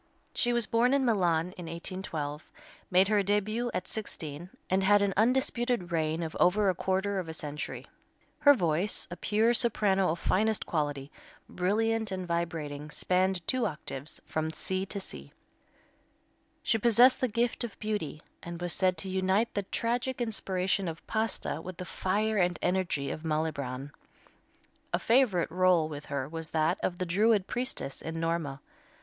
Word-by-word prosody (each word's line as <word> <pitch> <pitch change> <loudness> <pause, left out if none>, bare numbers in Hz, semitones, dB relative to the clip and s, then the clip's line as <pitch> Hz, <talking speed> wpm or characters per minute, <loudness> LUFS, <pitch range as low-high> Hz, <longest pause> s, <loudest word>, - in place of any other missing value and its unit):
She 240 - +1
was 240 -2 +2
born 240 +4 +3
in 275 -2 +2
Milan 180 -6 +2
in 175 - -6
1812, 165 -3 -5 0.4
made 185 +1 +5
her 210 -1 +3
début 210 +4 0
at - - -3
sixteen, 170 -6 -5 0.2
and 190 +1 +2
had 205 +1 +5
an 200 -1 +1
undisputed 240 - +1
reign 160 0 0
of 160 - -5
over 200 +3 +4
a - - +3
quarter 190 +2 0
of 175 -3 -5
a 160 - -5
century. 150 -1 -5 0.5
Her 285 -1 +7
voice, 175 -1 0
a - - -4
pure 220 +5 +2
soprano 205 -5 +2
of 165 - 0
finest 215 +5 +1
quality, 145 -3 -2 0.4
brilliant 220 +3 0
and 185 -1 -3
vibrating, 160 -4 -3
spanned 185 +2 +1
two 255 -2 +3
octaves, 150 -1 -7
from 155 0 -2
C 190 +3 -2
to 200 - -4
C. 70 - -7 1.3
She 225 - +2
possessed 240 +3 +6
the 255 - +3
gift 235 +2 0
of 235 - -6
beauty, 205 -8 -3 0.2
and 170 0 -7
was 175 -1 -2
said 185 -2 +2
to 175 - -4
unite 190 +4 +1
the 205 - 0
tragic 245 +3 -1
inspiration 195 -4 0
of 165 0 -6
Pasta 220 -7 -1
with 180 +1 -8
the 180 - -5
fire 210 +5 0
and 175 -2 +2
energy 180 -6 0
of 155 - -5
Malibran. 145 -4 -2 1.0
A - - +4
favorite 225 -10 +3
rôle 180 -2 +3
with 150 -1 -8
her 140 -2 -2
was 160 +1 -5
that 160 +3 +1
of 175 - -1
the 185 - -2
Druid 205 +3 +3
priestess 245 - -3
in 165 0 -5
"Norma." 165 -4 -2
185 Hz, 160 wpm, -30 LUFS, 160-215 Hz, 1.3 s, Her